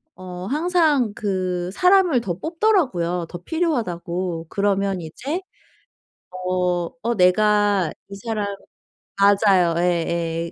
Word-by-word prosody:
어 180 Hz, 0 st, -8 dB
항상 305 Hz, -, +2 dB
그 185 Hz, -3 st, -2 dB
사람을 360 Hz, -, +4 dB
더 175 Hz, -6 st, -4 dB
뽑더라고요, 270 Hz, -, 0 dB
더 175 Hz, -, -6 dB
필요하다고. 180 Hz, -, -2 dB
그러면 195 Hz, -2 st, 0 dB
이제 275 Hz, -, -5 dB, 1.1 s
어 180 Hz, -2 st, 0 dB
어 235 Hz, 0 st, 0 dB
내가 205 Hz, 0 st, +3 dB, 0.2 s
이 200 Hz, -, -8 dB
사람 210 Hz, 0 st, -3 dB, 0.7 s
맞아요. 195 Hz, -4 st, +4 dB
예예. 170 Hz, -1 st, -1 dB
195 Hz, 205 characters per minute, -22 LUFS, 175-240 Hz, 1.1 s, 사람을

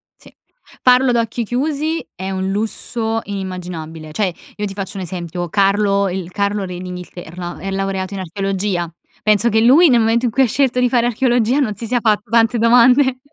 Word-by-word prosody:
sì, -, -, -19 dB, 0.5 s
farlo 255 Hz, +1 st, +5 dB
ad 240 Hz, -, +2 dB
occhi 230 Hz, 0 st, -1 dB
chiusi 300 Hz, +7 st, -2 dB
è 190 Hz, +2 st, -5 dB
un 190 Hz, 0 st, -2 dB
lusso 225 Hz, +2 st, -2 dB
inimmaginabile, 175 Hz, -5 st, -6 dB
cioè, 190 Hz, -1 st, 0 dB, 0.2 s
io 210 Hz, -, -3 dB
ti 195 Hz, -, -5 dB
faccio 195 Hz, 0 st, -6 dB
un 190 Hz, -, -4 dB
esempio: 175 Hz, -1 st, -5 dB
Carlo, 200 Hz, 0 st, +2 dB
il 180 Hz, -1 st, -5 dB
Carlo 200 Hz, 0 st, -1 dB
re 180 Hz, -1 st, -6 dB
d'Inghilterra 180 Hz, -1 st, -8 dB
è 195 Hz, 0 st, -5 dB
laureato 195 Hz, 0 st, -2 dB
in 195 Hz, -, -4 dB
archeologia. 190 Hz, -1 st, -2 dB, 0.3 s
Penso 215 Hz, +2 st, +3 dB
che 220 Hz, -, +2 dB
lui 295 Hz, +9 st, +6 dB
nel 240 Hz, -3 st, +4 dB
momento 230 Hz, +2 st, +2 dB
in 240 Hz, -, 0 dB
cui 265 Hz, +4 st, +3 dB
ha 255 Hz, -, +3 dB
scelto 255 Hz, +1 st, +1 dB
di 250 Hz, -, +3 dB
fare 240 Hz, -1 st, +2 dB
archeologia 245 Hz, +1 st, +1 dB
non 220 Hz, -7 st, 0 dB
si 230 Hz, -, -6 dB
sia 245 Hz, +1 st, +1 dB
fatto 210 Hz, -2 st, 0 dB
tante 230 Hz, 0 st, +3 dB
domande, 250 Hz, +3 st, +4 dB
210 Hz, 190 wpm, -18 LUFS, 190-240 Hz, 0.5 s, lui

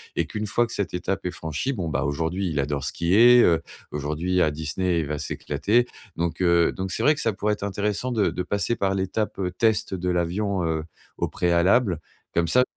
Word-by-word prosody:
et -, -, +1 dB
qu'une 105 Hz, 0 st, -4 dB
fois 120 Hz, +4 st, +2 dB
que 115 Hz, -, -7 dB
cette 100 Hz, -4 st, -2 dB
étape 95 Hz, +2 st, -3 dB
est 90 Hz, -, -1 dB
franchie, 80 Hz, -, -3 dB
bon, 90 Hz, -8 st, -3 dB
bah, 65 Hz, -3 st, -1 dB
aujourd'hui, 85 Hz, +6 st, -1 dB
il 75 Hz, -, -2 dB
adore 70 Hz, 0 st, -1 dB
skier, 115 Hz, +8 st, +5 dB
heu, 85 Hz, -2 st, +4 dB, 0.3 s
aujourd'hui 75 Hz, +5 st, -1 dB
à 80 Hz, -, +4 dB
Disney, 85 Hz, +4 st, -1 dB
il 75 Hz, -, -3 dB
va 75 Hz, 0 st, -3 dB
s'éclater, 110 Hz, +10 st, 0 dB, 0.3 s
donc, 85 Hz, +1 st, -2 dB
heu, 85 Hz, -2 st, +4 dB
donc 95 Hz, 0 st, -4 dB
c'est -, -, -1 dB
vrai 150 Hz, -, +6 dB
que 150 Hz, -, -4 dB
ça 115 Hz, -, +1 dB
pourrait 105 Hz, +2 st, 0 dB
être 105 Hz, -, -6 dB
intéressant 105 Hz, +5 st, -1 dB
de 105 Hz, -5 st, +2 dB
de 90 Hz, -, -3 dB
passer 100 Hz, +5 st, -1 dB
par 95 Hz, -3 st, 0 dB
l'étape, 95 Hz, +3 st, -2 dB
heu, 90 Hz, -2 st, -2 dB
test 110 Hz, +1 st, +1 dB
de 90 Hz, 0 st, -2 dB
l'avion, 90 Hz, +2 st, 0 dB
heu, 80 Hz, -1 st, -1 dB, 0.3 s
au -, -, 0 dB
préalable. 90 Hz, +2 st, +2 dB, 0.3 s
Comme 85 Hz, 0 st, +1 dB
ça, 125 Hz, +10 st, +4 dB
90 Hz, 210 wpm, -24 LUFS, 85-105 Hz, 0.3 s, vrai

